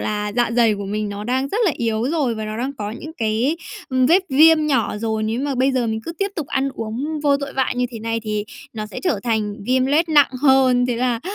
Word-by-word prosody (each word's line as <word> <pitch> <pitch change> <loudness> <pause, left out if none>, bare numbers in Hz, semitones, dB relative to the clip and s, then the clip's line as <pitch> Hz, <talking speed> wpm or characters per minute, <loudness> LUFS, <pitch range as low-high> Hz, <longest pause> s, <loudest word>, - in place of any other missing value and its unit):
là 210 -1 -2
dạ 240 -1 +2
dày 230 -3 +4
của 200 - -6
mình 210 +1 -3
nó 205 +1 -6
đang 260 +3 -1
rất 420 - -2
là 345 - +3
yếu 225 -1 -1
rồi 285 -8 0
và 220 -1 -5
nó 215 +1 -5
đang 265 +3 -2
có 205 0 -3
những 310 +7 -8
cái, 235 +4 0 0.3
ừm, 260 -1 +2
vết 365 +5 +4
viêm 310 +3 +5
nhỏ 245 -8 +1
rồi, 220 0 -2
nếu 225 +3 -1
mà 280 -1 -1
bây 260 +2 +2
giờ 250 -2 0
mình 220 0 -2
cứ 335 - -5
tiếp 395 0 0
tục 305 -4 -3
ăn 270 0 0
uống 265 +8 -4
vô 285 -1 +3
tội 280 -1 -6
vạ 265 -1 +1
như 250 0 0
thế 230 - -7
này 230 +1 -2
thì 210 -1 -2 0.3
nó 215 -2 -5
sẽ - - -8
trở 305 - 0
thành 215 -3 -1
viêm 260 +1 +2
loét 315 +4 +2
nặng 295 -3 +5
hơn. 260 -3 +4
Thế 245 - -1
là, 240 -1 0
245 Hz, 260 wpm, -20 LUFS, 220-280 Hz, 0.3 s, viêm